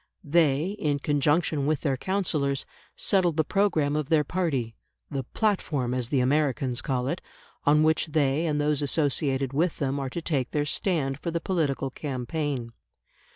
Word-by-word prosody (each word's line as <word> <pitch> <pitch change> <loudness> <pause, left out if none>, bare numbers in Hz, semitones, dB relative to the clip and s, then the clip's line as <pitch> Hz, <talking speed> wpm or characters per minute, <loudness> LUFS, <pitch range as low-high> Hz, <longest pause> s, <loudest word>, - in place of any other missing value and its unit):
They, 155 +2 +2
in 145 -2 +1
conjunction 145 +1 +1
with 155 -2 +1
their 140 -3 +1
counsellors, 150 -5 -1 0.3
settle 185 -4 +2
the 155 +1 +2
programme 155 -6 +1
of 150 -2 -2
their 160 -2 +4
party 140 -9 -1 0.4
the 135 -3 -3
"platform," 150 - 0
as 125 -2 -1
the 135 -3 +2
Americans 130 -2 +1
call 130 -2 -1
it, 170 +6 -2 0.4
on 150 +1 +5
which 160 +1 +2
they 150 +1 +1
and 150 -1 0
those 150 -1 +1
associated 140 -2 0
with 165 +4 +1
them 140 0 -1
are 135 -1 -3
to 170 - -4
take 135 -6 0
their 145 -1 0
stand 145 -5 -1
for 170 - -3
the 170 0 -1
political 145 -8 -1
campaign. 130 -2 -3
145 Hz, 160 wpm, -27 LUFS, 135-160 Hz, 0.4 s, on